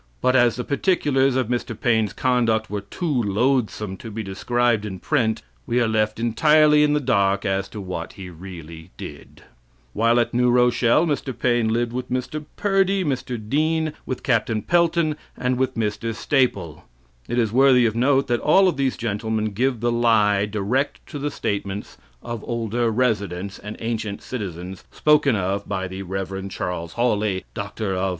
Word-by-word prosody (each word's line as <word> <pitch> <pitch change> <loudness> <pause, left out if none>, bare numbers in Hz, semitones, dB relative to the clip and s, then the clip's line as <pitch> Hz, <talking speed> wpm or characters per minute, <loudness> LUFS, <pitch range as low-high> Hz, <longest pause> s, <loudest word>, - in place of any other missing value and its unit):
But 130 - +2
as 120 -2 +4
the 125 - -3
particulars 140 -4 +1
of 130 -3 +1
Mr. 120 -2 -3
Paine's 110 -3 +2
conduct 115 -4 +1
"were 105 -1 -2
too 135 - -2
loathsome 110 -2 0
to 115 - -9
be 110 +1 -5
described 115 +3 0
in 100 -3 -5
print," 110 - 0 0.2
we 120 - +1
are 120 - +2
left 110 0 0
entirely 150 +6 +4
in 150 0 +3
the 150 - +2
dark 100 -7 +1
as 95 0 -1
to 105 - -8
what 90 -4 -5
he 95 -2 -9
really 85 -2 -10
did. 75 - -10 0.5
While 115 +2 +3
at 120 - 0
New 125 +1 +3
Rochelle, 125 +4 +3
Mr. 140 -5 -2
Paine 120 -2 +2
lived 115 +1 0
with 125 +1 -4
Mr. 130 +4 -3
Purdy, 195 -1 +2
Mr. 130 -3 -2
Dean, 155 +8 0
with 130 - -4
Capt. 115 -4 +1 0.2
Pelton, 170 -3 +2 0.2
and 125 0 -1
with 130 0 0
Mr. 110 +1 -2
Staple. 105 - 0 0.4
It 120 - -2
is 115 -4 +2
worthy 130 -1 +5
of 110 -1 0
note 135 +3 +3
that 120 -1 0
all 190 +5 +5
of 180 - 0
these 135 -2 0
gentlemen 110 0 -2
give 125 +2 0
the 120 0 +1
lie 105 -4 +3
direct 110 +7 -1
to 145 - -5
the 145 +1 -1
statements 100 -5 -4 0.2
of 115 -2 -5
"older 115 0 -1
residents" 100 -5 -1
and 105 +1 -8
ancient 110 -3 -3
citizens 95 -6 -6
spoken 150 -4 +3
of 100 0 -2
by 95 -2 -2
the 95 +1 -7
Rev. 95 +1 -4
Charles 85 -3 -4
Hawley, 105 -5 0
D.D. 100 -2 -3
115 Hz, 170 wpm, -23 LUFS, 100-130 Hz, 0.5 s, worthy